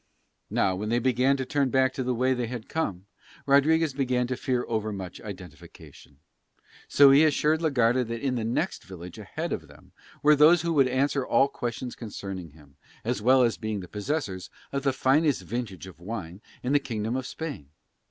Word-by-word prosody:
Now 95 -1 +1
when 105 +3 -4
they 120 - +2
began 130 +3 +2
to 130 - -3
turn 140 0 0
back 130 0 +2
by - - -2
the 125 -1 -1
way 130 +2 +2
they 125 -2 -2
had 120 -2 -6
come 100 - -3 0.4
Rodriguez 150 +2 +3
began 130 -2 0
to 130 +1 -2
fear 125 -1 -1
overmuch 105 -5 -4
identification, 90 -7 -12 0.7
so 140 -1 +7
he 140 +3 +7
assured 155 +1 +2
la 160 - +2
Garda 125 -2 +2
that 115 0 -4
in 135 +1 -1
the 120 -3 -2
next 120 +11 -2
village 90 -2 -10
ahead - - -4
of - - -5
them - - -18 0.3
were 150 +1 +6
those 155 +3 +6
who 170 0 0
would 135 -4 +4
answer 135 +2 +1
all 125 +2 +3
questions 125 -2 -5
concerning 95 -6 -7
him, 70 -2 -20 0.3
as - - -2
well 130 +3 +5
as 115 -2 +1
being 110 -3 -3
the 90 - -9
possessors 105 - -3 0.2
of 140 - -2
the 135 0 +1
finest 135 +3 +2
vintage 115 -7 -5
of 95 -3 -13
wine 95 -1 -7 0.2
in 125 +3 0
the 145 - +5
kingdom 115 -3 -3
of 130 0 -3
Spain. 140 - -6
125 Hz, 190 wpm, -27 LUFS, 105-140 Hz, 0.7 s, so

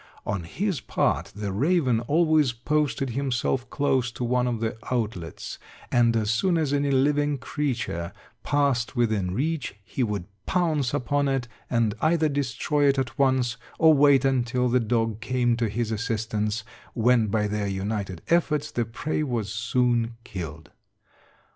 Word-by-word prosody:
On 100 -4 -2
his 185 - -2
part - - 0
the 105 -1 -3
raven 130 - +2
always 155 +1 +3
posted 135 +1 0
himself 130 0 -1
close 135 -3 +1
to 125 - -4
one 125 +1 +1
of 120 -2 -1
the 110 -1 -2 0.2
outlets, 105 -9 -3 0.3
and 120 -2 +4
as 110 -1 0
soon 170 +10 +2
as 150 -3 0
any 145 0 +1
living 145 +2 +2
creature 120 - -3 0.3
passed 140 -5 +1
within 110 -6 +1
reach, 150 -4 -2
he 130 - -4
would 105 -6 -1 0.2
pounce 155 -8 +1
upon 145 +1 0
it, 135 -3 0 0.2
and 115 -4 +2
either 160 -1 +3
destroy 145 +1 0
it 140 0 +3
at 130 0 -2
once 130 -4 +2 0.2
or 160 -1 +6
wait 140 -2 +5
until 125 -1 +1
the 125 +1 +3
dog 115 -2 0
came 120 0 +1
to 115 -2 0
his 115 +1 -2
assistance, 110 -1 -2 0.3
when 115 -1 +3
by 105 +1 +1
their 105 0 -2
united 100 -2 -3
efforts 155 -3 +1
the 120 - -1
prey 135 +8 -3
was 115 -8 -2
soon 115 +1 +1
killed. 80 -7 -7
125 Hz, 150 wpm, -25 LUFS, 110-145 Hz, 0.3 s, or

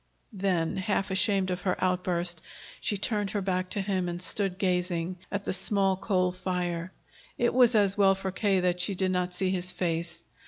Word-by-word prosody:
Then, 185 -4 0
half 195 0 -1
ashamed 190 0 +2
of 180 0 -3
her 185 - 0
outburst, 180 -2 0 0.4
she 205 - -1
turned 205 0 -1
her 205 - -2
back 185 -1 -1
to 200 - -2
him 190 -2 -1
and 175 0 -4
stood 190 0 -1
gazing 180 -2 -1
at 200 0 -3
the - - -1
small 195 0 +2
coal 185 -2 +1
fire. 180 -1 -3 0.5
It 240 - +2
was 250 -2 +5
as 200 -1 +3
well 195 -1 +6
for 190 0 -4
K. 190 0 +1
that 180 0 +1
she 185 +2 -1
did 185 0 0
not 180 -1 0
see 185 +1 -1
his 180 -1 -1
face. 170 -1 -2
185 Hz, 190 wpm, -28 LUFS, 180-195 Hz, 0.5 s, well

